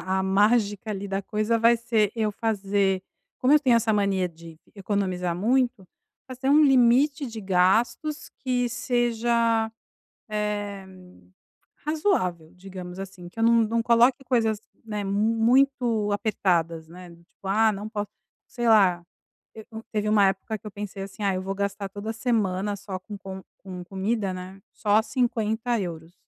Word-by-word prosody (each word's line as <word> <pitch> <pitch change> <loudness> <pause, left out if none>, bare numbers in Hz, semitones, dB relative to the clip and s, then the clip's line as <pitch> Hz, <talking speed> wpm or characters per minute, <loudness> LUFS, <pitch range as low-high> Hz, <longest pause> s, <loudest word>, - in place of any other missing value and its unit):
a 190 0 -1
mágica 205 +2 +2
ali 200 -1 -4
da 195 +1 -2
coisa 215 +3 0
vai 230 +1 +5
ser 225 -3 +1
eu 215 -2 0
fazer 200 -3 0 0.4
como 255 +3 +3
eu 300 - +6
tenho 250 -5 +4
essa 225 -1 +1
mania 195 -3 +1
de 165 -1 -14 0.2
economizar 185 -4 -2
muito, 235 0 +1 0.4
fazer 260 +1 -4
um 300 +1 +6
limite 270 +2 +4
de 225 -2 -7
gastos 205 +10 +1
que 250 -2 0
seja, 235 -1 +1 0.6
eh, 205 -2 -3 1.0
razoável, 300 - 0
digamos 185 -1 -9
assim, 190 -2 -8
que 185 - -17
eu - - +3
não 230 0 +5
não 230 +1 0
coloque 240 +3 +3
coisas, 225 -4 +1 0.2
né, 210 -2 -4
muito 225 +2 +2
apertadas, 170 -6 0
né, 180 +1 -12
do 170 0 -17
tipo: 190 - -16
"Ah, 220 +2 +3
não 205 +1 -6
posso" 210 -2 -4 0.4
sei 240 -1 -2
lá 190 -6 +4 0.5
te 220 -1 -11
hum, 220 - -6
teve 210 -1 -1
uma 210 -2 +5
época 195 +3 -3
que 215 - -15
eu - - -5
pensei 205 -1 -7
assim: 195 +2 -10
"Ah, 195 -1 +2
eu 185 - -2
vou 195 +1 -3
gastar 200 0 -3
toda 205 +3 -5
semana 210 -4 -1
só 195 -1 -6
com 205 +3 -9
com 190 -1 -8 0.2
com 185 -2 -8
comida, 195 +2 -2
né, 185 +1 -9
só 210 +1 +2
€50". 220 - -2
210 Hz, 155 wpm, -25 LUFS, 190-230 Hz, 1.0 s, eu